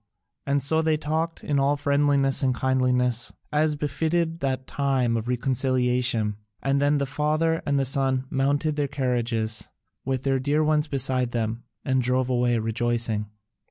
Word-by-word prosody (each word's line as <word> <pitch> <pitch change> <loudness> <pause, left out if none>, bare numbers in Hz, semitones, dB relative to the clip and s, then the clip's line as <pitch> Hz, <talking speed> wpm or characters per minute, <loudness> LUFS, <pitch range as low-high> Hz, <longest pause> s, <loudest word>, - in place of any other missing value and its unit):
And 140 0 +1
so 160 +3 +2
they 160 -1 +1
talked 160 +2 -2
in 145 -2 0
all 140 +1 +2
friendliness 140 -1 +2
and 130 -2 0
kindliness, 125 -2 +2 0.2
as 150 0 +2
befitted 160 +3 -1
that 130 -3 -2
time 130 -5 0
of 115 0 -3
reconciliation; 125 -3 +1 0.2
and 140 +1 0
then 145 +1 +3
the 140 - 0
father 155 +3 0
and 140 -2 +1
son 135 -1 +1
mounted 145 +3 0
their 145 -1 +1
carriages, 120 -5 -2 0.4
with 130 -1 -2
their 135 -1 +1
dear 145 +4 +1
ones 155 0 +2
beside 130 -3 0
them, 115 0 -2 0.2
and 130 -1 +2
drove 125 +1 0
away 120 -1 +2
rejoicing. 115 -1 -1
135 Hz, 150 wpm, -25 LUFS, 125-145 Hz, 0.4 s, then